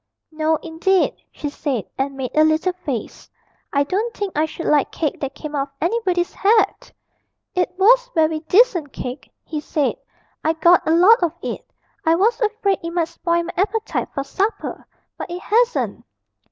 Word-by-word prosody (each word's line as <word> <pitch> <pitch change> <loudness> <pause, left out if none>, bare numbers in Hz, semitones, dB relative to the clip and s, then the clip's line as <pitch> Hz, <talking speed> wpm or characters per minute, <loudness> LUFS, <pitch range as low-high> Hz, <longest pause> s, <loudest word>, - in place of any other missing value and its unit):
'No, 315 0 +1
indeed,' 340 +3 +1
she 300 - -5
said, 280 -6 -3
and 270 0 -2
made 260 -2 -4
a 310 - +6
little 315 +4 +2
face; 280 - -6 0.4
'I 280 0 +2
don't 420 +10 -2
think 405 -2 -3
I 305 +1 +2
should 315 +1 -7
like 295 -2 +2
cake 305 -4 -2
that 275 -2 -4
came 305 -1 -7
out 275 -1 0
of 275 - -34
anybody's 355 -1 0
hat!' 430 +3 +2 0.6
'It 360 -2 +1
was - - +5
very 315 -1 +2
decent 345 - +3
cake,' 250 +2 -6 0.2
he 310 - -4
said; 295 -1 -1 0.5
'I 320 - +2
got 340 +2 +4
a - - +3
lot 370 +8 +6
of 340 -3 +1
it. - - -6 0.3
I 325 +1 +4
was 440 +8 +2
afraid 425 -3 +1
it 335 - -3
might 335 -1 -1
spoil 340 0 0
my 340 - -6
appetite 425 +4 -1
for 275 - -1
supper 395 +10 -3 0.3
but - - -5
it 350 +1 -5
hasn't.' 480 +3 +1
335 Hz, 175 wpm, -21 LUFS, 305-390 Hz, 0.6 s, a